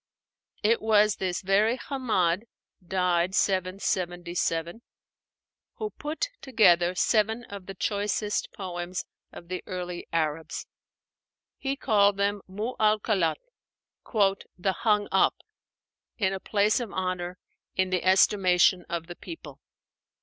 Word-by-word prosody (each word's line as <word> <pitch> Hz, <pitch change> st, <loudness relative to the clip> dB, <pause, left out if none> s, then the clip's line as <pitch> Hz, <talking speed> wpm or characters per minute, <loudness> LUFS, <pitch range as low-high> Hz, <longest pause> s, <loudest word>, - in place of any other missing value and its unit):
It 225 Hz, +2 st, +3 dB
was 215 Hz, -1 st, +4 dB
this 185 Hz, -1 st, -2 dB
very 210 Hz, +5 st, +3 dB
Hammád 220 Hz, -9 st, 0 dB, 0.4 s
(died 180 Hz, 0 st, +1 dB
777) 175 Hz, -1 st, -1 dB, 0.9 s
who 430 Hz, -1 st, -4 dB
put 305 Hz, +10 st, -3 dB
together 180 Hz, -8 st, +4 dB
seven 220 Hz, +4 st, +2 dB
of 200 Hz, -4 st, -9 dB
the 195 Hz, -, -7 dB
choicest 205 Hz, +1 st, -1 dB
poems 180 Hz, -2 st, -5 dB, 0.3 s
of 170 Hz, -, -11 dB
the 185 Hz, 0 st, -4 dB
early 180 Hz, -2 st, -5 dB
Arabs. 160 Hz, -1 st, -2 dB, 0.9 s
He 275 Hz, 0 st, -1 dB
called 205 Hz, -6 st, +3 dB
them 200 Hz, 0 st, 0 dB
'Mu 210 Hz, +6 st, -4 dB
'allakât,' 215 Hz, -5 st, +2 dB, 1.2 s
"the 190 Hz, +2 st, +1 dB
hung 210 Hz, -1 st, +1 dB
up" 190 Hz, -, +4 dB, 0.8 s
(in 195 Hz, -3 st, +1 dB
a 190 Hz, -, -3 dB
place 210 Hz, +3 st, +2 dB
of 235 Hz, -5 st, -5 dB
honor, 185 Hz, -1 st, -3 dB, 0.4 s
in 185 Hz, 0 st, +1 dB
the 180 Hz, -2 st, 0 dB
estimation 185 Hz, -1 st, +4 dB
of 170 Hz, -1 st, -3 dB
the 175 Hz, +1 st, -9 dB
people). 330 Hz, -, -10 dB
190 Hz, 115 wpm, -27 LUFS, 180-215 Hz, 1.2 s, was